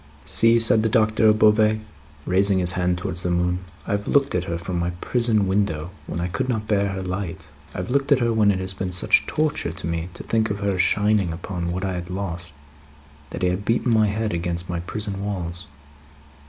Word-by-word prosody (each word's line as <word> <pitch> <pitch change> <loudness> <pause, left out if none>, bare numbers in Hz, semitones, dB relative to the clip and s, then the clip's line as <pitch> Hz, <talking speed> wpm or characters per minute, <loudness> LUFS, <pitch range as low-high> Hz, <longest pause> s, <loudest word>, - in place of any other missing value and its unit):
"See!" 115 +1 +5
said 115 -1 +5
the 110 - +1
Doctor 110 0 +3
of 105 0 +5
Beauvais, 110 0 +4 0.5
raising 95 +1 +3
his 90 -1 +4
hand 90 -1 0
towards 90 -1 -3
the 90 - -2
moon. 90 0 0 0.3
"I - - -4
have 100 0 -2
looked 140 -1 +2
at 90 0 -1
her 85 -1 -3
from 85 +1 -4
my 85 0 -1
prison 115 -3 +1
window, 90 -5 -1 0.2
when - - -4
I 85 - -1
could 130 +9 -3
not 110 -3 -2
bear 100 -1 +1
her 95 -1 -4
light. 90 -3 -5 0.3
I - - -5
have 90 +5 -4
looked 140 +2 0
at 140 - +6
her 120 -2 +1
when 110 -2 +3
it 100 - +2
has 95 0 -4
been 95 -1 -4
such 90 - +3
torture 155 0 -1
to - - -7
me 85 +1 -3
to - - -8
think 110 -1 0
of 100 0 -3
her 100 -2 -1
shining 105 -2 +2
upon 85 0 -4
what 90 +2 -3
I 95 - -2
had 90 0 -5
lost, 90 -3 -5 0.8
that - - -6
I 90 - +3
have 90 +3 -2
beaten 115 +2 +1
my 110 -1 +4
head 105 0 -2
against 85 +1 -3
my 85 - -2
prison 100 +2 -4
walls. 90 -5 -4
95 Hz, 220 wpm, -23 LUFS, 90-110 Hz, 0.8 s, at